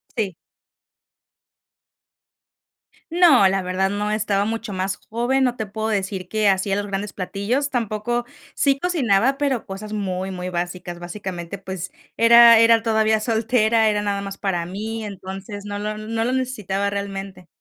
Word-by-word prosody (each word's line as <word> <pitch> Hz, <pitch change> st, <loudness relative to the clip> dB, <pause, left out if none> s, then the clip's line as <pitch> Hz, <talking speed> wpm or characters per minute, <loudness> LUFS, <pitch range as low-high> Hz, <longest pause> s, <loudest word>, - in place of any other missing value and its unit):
Sí. 200 Hz, -6 st, -1 dB, 2.8 s
No, 325 Hz, -, +6 dB
la 195 Hz, 0 st, +1 dB
verdad 185 Hz, +1 st, 0 dB
no, 205 Hz, +1 st, -2 dB
estaba 210 Hz, -2 st, +1 dB
mucho 225 Hz, -1 st, -4 dB
más 190 Hz, +1 st, -2 dB
joven, 245 Hz, +4 st, +1 dB
no 250 Hz, -1 st, +1 dB
te 220 Hz, -3 st, -4 dB
puedo 220 Hz, +2 st, -3 dB
decir 195 Hz, -3 st, -2 dB
que 215 Hz, -1 st, +2 dB
hacía 195 Hz, +1 st, +1 dB
los 205 Hz, 0 st, -2 dB
grandes 200 Hz, +1 st, -4 dB
platillos 205 Hz, +9 st, -2 dB
tampoco. 240 Hz, -1 st, -2 dB, 0.3 s
Sí 275 Hz, -1 st, +2 dB
cocinaba, 270 Hz, -, +2 dB
pero 275 Hz, -5 st, -1 dB
cosas 210 Hz, +2 st, -7 dB
muy, 190 Hz, -2 st, -3 dB
muy 180 Hz, 0 st, -5 dB
básicas. 175 Hz, 0 st, -4 dB
Básicamente, 175 Hz, 0 st, -6 dB
pues, 190 Hz, -2 st, -6 dB, 0.3 s
era 235 Hz, 0 st, +8 dB
era 230 Hz, 0 st, +6 dB
todavía 220 Hz, -1 st, +2 dB
soltera, 225 Hz, 0 st, +2 dB
era 210 Hz, -1 st, 0 dB
nada 200 Hz, -1 st, -1 dB
más 195 Hz, 0 st, -6 dB
para 175 Hz, -4 st, -1 dB
mí. 220 Hz, +5 st, -5 dB
Entonces, 195 Hz, +1 st, -7 dB
no 205 Hz, 0 st, -4 dB
lo 210 Hz, +1 st, -3 dB
no 225 Hz, +1 st, -2 dB
lo 250 Hz, -, 0 dB
necesitaba 210 Hz, -7 st, -1 dB
realmente. 195 Hz, -2 st, -5 dB
205 Hz, 150 wpm, -22 LUFS, 195-230 Hz, 2.8 s, era